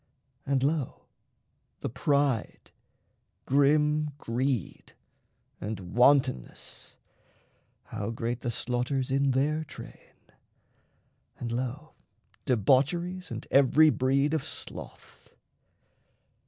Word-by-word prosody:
And 135 Hz, -1 st, +1 dB
lo, 145 Hz, -1 st, -1 dB, 0.8 s
the -, -, -2 dB
pride, 140 Hz, -1 st, 0 dB, 0.7 s
grim 150 Hz, +2 st, +3 dB
greed, 125 Hz, -3 st, -2 dB, 0.7 s
and 100 Hz, -4 st, -6 dB
wantonness 125 Hz, -, +1 dB, 0.9 s
How 110 Hz, -2 st, -5 dB
great 115 Hz, +1 st, -3 dB
the 120 Hz, -, -3 dB
slaughters 125 Hz, +2 st, -1 dB
in 135 Hz, +1 st, +2 dB
their 145 Hz, +4 st, +1 dB
train! 150 Hz, -, -12 dB, 1.2 s
and 120 Hz, -, -4 dB
lo, 130 Hz, +6 st, -4 dB, 0.5 s
Debaucheries 150 Hz, -, +1 dB
and -, -, -6 dB
every 145 Hz, +3 st, +6 dB
breed 140 Hz, +3 st, +1 dB
of 160 Hz, -, 0 dB
sloth! -, -, -10 dB
135 Hz, 85 wpm, -28 LUFS, 120-145 Hz, 1.2 s, every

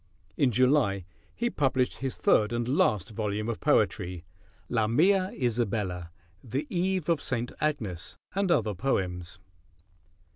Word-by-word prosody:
In 135 Hz, -, +3 dB
July 125 Hz, -, +2 dB, 0.3 s
he 240 Hz, +1 st, -1 dB
published 130 Hz, -2 st, +1 dB
his 135 Hz, -1 st, -3 dB
third 105 Hz, 0 st, +3 dB
and 120 Hz, 0 st, -1 dB
last 110 Hz, -, +2 dB
volume 105 Hz, 0 st, -2 dB
of 115 Hz, -, -2 dB
poetry, 90 Hz, -1 st, +1 dB, 0.4 s
"Lamia, 165 Hz, -, +3 dB
Isabella, 105 Hz, -8 st, -1 dB, 0.3 s
The 130 Hz, +5 st, -3 dB
Eve 185 Hz, -1 st, 0 dB
of 165 Hz, -4 st, +2 dB
St. 120 Hz, -1 st, -2 dB
Agnes, 110 Hz, -, -2 dB, 0.2 s
and 195 Hz, 0 st, 0 dB
Other 110 Hz, -10 st, +2 dB
Poems." 90 Hz, -5 st, -2 dB
120 Hz, 120 wpm, -28 LUFS, 100-145 Hz, 0.4 s, In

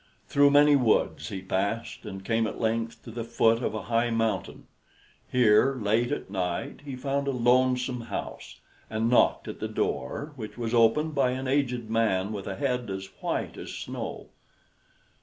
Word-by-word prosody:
Through 145 Hz, 0 st, +5 dB
many 145 Hz, +1 st, +6 dB
woods 125 Hz, -6 st, +1 dB
he 95 Hz, -1 st, -6 dB
passed, 100 Hz, +6 st, -2 dB
and 95 Hz, -1 st, -7 dB
came 115 Hz, 0 st, +1 dB
at -, -, -6 dB
length 115 Hz, 0 st, -1 dB
to 115 Hz, -, -9 dB
the 115 Hz, +1 st, -4 dB
foot 115 Hz, 0 st, +2 dB
of 115 Hz, -, -2 dB
a 110 Hz, -, -4 dB
high 115 Hz, +1 st, +1 dB
mountain. 115 Hz, -1 st, -1 dB, 0.7 s
Here, 125 Hz, +2 st, +4 dB
late 115 Hz, +2 st, +1 dB
at 145 Hz, -, -4 dB
night, 90 Hz, +2 st, -3 dB
he 140 Hz, -3 st, -6 dB
found 140 Hz, +2 st, -2 dB
a -, -, +2 dB
lonesome 125 Hz, 0 st, +2 dB
house, -, -, -6 dB, 0.3 s
and 110 Hz, +2 st, 0 dB
knocked 125 Hz, -, +3 dB
at -, -, -6 dB
the -, -, -2 dB
door, 145 Hz, -, -3 dB
which 110 Hz, -4 st, -8 dB
was 115 Hz, -1 st, -3 dB
opened 120 Hz, +7 st, +3 dB
by 140 Hz, -3 st, +2 dB
an 130 Hz, +1 st, -4 dB
aged 125 Hz, -4 st, 0 dB
man 105 Hz, -3 st, +1 dB
with 100 Hz, -2 st, -6 dB
a 95 Hz, -, -3 dB
head 125 Hz, 0 st, -1 dB
as 95 Hz, 0 st, -5 dB
white -, -, -2 dB
as -, -, -7 dB
snow. -, -, -6 dB
115 Hz, 175 wpm, -27 LUFS, 110-130 Hz, 0.7 s, many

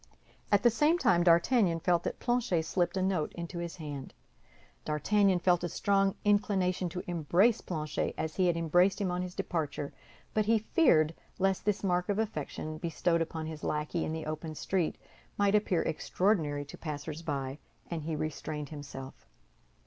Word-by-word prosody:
At 205 Hz, -1 st, +4 dB
the 240 Hz, -, +6 dB
same 300 Hz, +8 st, +3 dB
time 175 Hz, -, +3 dB
D'Artagnan 170 Hz, +1 st, +4 dB
felt 175 Hz, 0 st, +2 dB
that -, -, -3 dB
Planchet 240 Hz, -9 st, +1 dB
slipped 175 Hz, +2 st, 0 dB
a 185 Hz, -, +1 dB
note 185 Hz, -5 st, 0 dB
into 170 Hz, +1 st, -6 dB
his 170 Hz, -1 st, -5 dB
hand. 145 Hz, -5 st, -7 dB, 0.7 s
D'Artagnan 190 Hz, +6 st, +2 dB
felt 175 Hz, 0 st, +2 dB
a 175 Hz, -, -1 dB
strong 195 Hz, +3 st, +2 dB
inclination 195 Hz, -3 st, +2 dB
to 180 Hz, +2 st, -5 dB
embrace 175 Hz, +7 st, +2 dB
Planchet 155 Hz, -4 st, -3 dB
as 160 Hz, -1 st, -3 dB
he 185 Hz, -2 st, +3 dB
had 170 Hz, -1 st, +2 dB
embraced 175 Hz, +4 st, +3 dB
him 195 Hz, -3 st, 0 dB
on 180 Hz, 0 st, -1 dB
his 180 Hz, 0 st, -5 dB
departure; 145 Hz, -4 st, -3 dB, 0.4 s
but 215 Hz, -1 st, +2 dB
he 225 Hz, 0 st, +5 dB
feared 205 Hz, -, +3 dB, 0.2 s
lest 195 Hz, 0 st, +1 dB
this 210 Hz, -1 st, 0 dB
mark 180 Hz, -1 st, +1 dB
of 205 Hz, -, +1 dB
affection, 155 Hz, -6 st, -3 dB
bestowed 170 Hz, 0 st, 0 dB
upon 160 Hz, -1 st, -3 dB
his 155 Hz, -1 st, -7 dB
lackey 150 Hz, +2 st, -1 dB
in -, -, -2 dB
the 160 Hz, 0 st, -4 dB
open 155 Hz, +1 st, -5 dB
street, 180 Hz, +1 st, -1 dB, 0.4 s
might 200 Hz, 0 st, +3 dB
appear 205 Hz, -5 st, +2 dB
extraordinary 155 Hz, -5 st, 0 dB
to 140 Hz, -, -11 dB
passers 150 Hz, 0 st, -5 dB
by, 140 Hz, -3 st, -3 dB, 0.3 s
and 165 Hz, -2 st, -2 dB
he 155 Hz, +1 st, -3 dB
restrained 150 Hz, -1 st, -4 dB
himself. 135 Hz, -3 st, -9 dB
170 Hz, 170 wpm, -31 LUFS, 155-195 Hz, 0.7 s, the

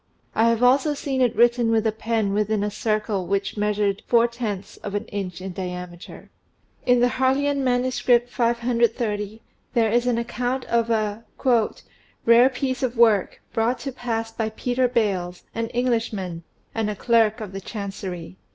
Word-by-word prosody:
I 230 Hz, +1 st, +4 dB
have 230 Hz, +1 st, +1 dB
also 275 Hz, +4 st, +4 dB
seen 270 Hz, -2 st, -2 dB
it 245 Hz, -2 st, +2 dB
written 240 Hz, +1 st, +4 dB
with 225 Hz, -1 st, +2 dB
a 220 Hz, -, +3 dB
pen 220 Hz, -2 st, -1 dB
within 210 Hz, 0 st, +1 dB
a 210 Hz, -, -1 dB
circle 210 Hz, -3 st, -1 dB
which 195 Hz, +1 st, -1 dB
measured 210 Hz, -1 st, 0 dB
four 235 Hz, 0 st, +4 dB
tenths 210 Hz, -5 st, -5 dB
of 205 Hz, 0 st, -6 dB
an 205 Hz, -, -2 dB
inch 190 Hz, -3 st, -5 dB
in 190 Hz, -1 st, -5 dB
diameter. 180 Hz, -1 st, -7 dB, 0.6 s
In 245 Hz, -1 st, +5 dB
the 245 Hz, -, +5 dB
Harleian 270 Hz, +2 st, +1 dB
manuscript, 245 Hz, -1 st, +2 dB
530, 230 Hz, -3 st, 0 dB, 0.3 s
there 225 Hz, -2 st, +3 dB
is 240 Hz, +2 st, +2 dB
an 240 Hz, -2 st, +2 dB
account 245 Hz, +2 st, -2 dB
of 235 Hz, 0 st, +1 dB
a 215 Hz, -1 st, 0 dB, 1.0 s
"rare 235 Hz, +3 st, +7 dB
piece 260 Hz, 0 st, -2 dB
of 255 Hz, -2 st, -1 dB
work, 220 Hz, -5 st, +3 dB
brought 230 Hz, +3 st, +1 dB
to 275 Hz, -, -4 dB
pass 230 Hz, -3 st, -3 dB
by 220 Hz, -1 st, -2 dB
Peter 250 Hz, +3 st, 0 dB
Bales, 195 Hz, -7 st, -1 dB
an 230 Hz, 0 st, -2 dB
Englishman, 225 Hz, -8 st, -1 dB, 0.3 s
and 220 Hz, -2 st, -1 dB
a 210 Hz, -, -3 dB
clerk 225 Hz, 0 st, +2 dB
of 210 Hz, -4 st, -6 dB
the 195 Hz, 0 st, -6 dB
chancery." 190 Hz, -4 st, -6 dB
225 Hz, 160 wpm, -23 LUFS, 205-245 Hz, 1.0 s, rare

